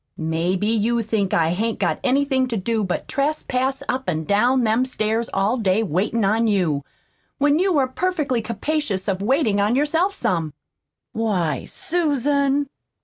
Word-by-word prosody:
"Maybe 170 +4 -1
you 230 +1 +1
think 210 -3 -1
I 165 -1 +2
hain't 225 +5 -1
got - - 0
anything 265 0 +2
to 235 -3 -2
do 220 +2 -1
but 185 -3 -3
trespass 270 -2 -1
up 260 -2 -2
an' 160 -2 -1
down 240 +8 +2
them 225 +2 +2
stairs 225 -2 -1
all 200 +6 +1
day 210 -1 +1
waitin' 205 +4 0
on 225 +3 +2
you, 175 -9 +1 0.5
when 290 +2 +3
you 370 -3 +2
are 265 -2 +3
perfectly 295 -5 -1
capacious 230 -2 -2
of 195 -1 -1
waitin' 225 -2 +2
on 210 +4 +2
yourself 325 +8 +1
SOME." 165 - -1 0.6
"Why, 195 -9 -1
SUSAN!" 285 -3 0
230 Hz, 150 wpm, -22 LUFS, 195-275 Hz, 0.6 s, when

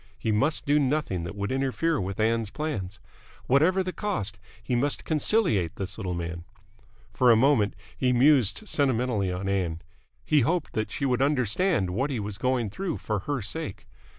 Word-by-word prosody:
He 110 - -1
must 135 +11 +1
do 145 +1 +3
nothing 135 - 0
that 85 - -6
would 100 +2 -3
interfere 135 +3 0
with 95 +2 -4
Ann's 115 -1 +1
plans. 105 -10 -4 0.5
Whatever 165 +9 +3
the 185 0 -4
cost, 115 - -3 0.2
he 120 - -3
must 140 +4 0
conciliate 155 - +2
this 95 0 -5
little 95 -5 -4
man. 85 0 -5 0.7
For 125 -2 +4
a 115 - +8
moment 115 -4 +3 0.2
he 125 -1 +1
mused 130 - +3
sentimentally 125 - +1
on 90 +2 -4
Ann. 90 -4 -1 0.5
He 155 - +4
hoped 165 +6 0
she 140 - -3
would 125 -1 +1
understand 135 - +1
what 130 +10 -1
he 130 -5 -2
was 105 -1 -5
going 125 -5 0
through 180 - -3
for 110 -2 -2
her 140 -6 -1
sake. 155 +2 -4
125 Hz, 170 wpm, -26 LUFS, 100-145 Hz, 0.7 s, a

